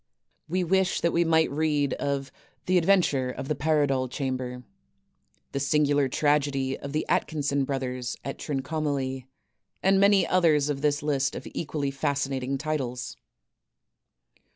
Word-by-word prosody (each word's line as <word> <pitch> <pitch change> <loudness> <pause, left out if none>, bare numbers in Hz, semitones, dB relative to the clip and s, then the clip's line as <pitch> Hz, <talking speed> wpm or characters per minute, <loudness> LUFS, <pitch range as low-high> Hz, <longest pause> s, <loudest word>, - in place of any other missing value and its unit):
We 185 +2 0
wish 190 +1 +1
we 170 0 +3
might 160 -1 +3
read 145 -2 +1
of 140 -1 -2 0.3
"The 185 0 +4
Adventure 165 -8 +2
of 135 +1 -6
the - - +2
Paradol 140 -3 +1
Chamber," 130 -2 -4 0.9
"The 140 - -2
Singular 145 -1 +2
Tragedy 140 -2 +1
of 140 - -7
the 155 +1 -1
Atkinson 140 -3 0
Brothers 130 -2 -3
at 135 - -5
Trincomalee," 140 -2 -2 0.6
and 195 0 +4
many 200 -1 +5
others 155 -5 +3
of 140 -2 -2
this 145 0 +1
list 140 -3 0
of - - -7
equally 145 -3 -2
fascinating 135 -1 -1
titles: 135 -4 -3 1.2
"r - - -42
145 Hz, 130 wpm, -27 LUFS, 135-155 Hz, 1.2 s, many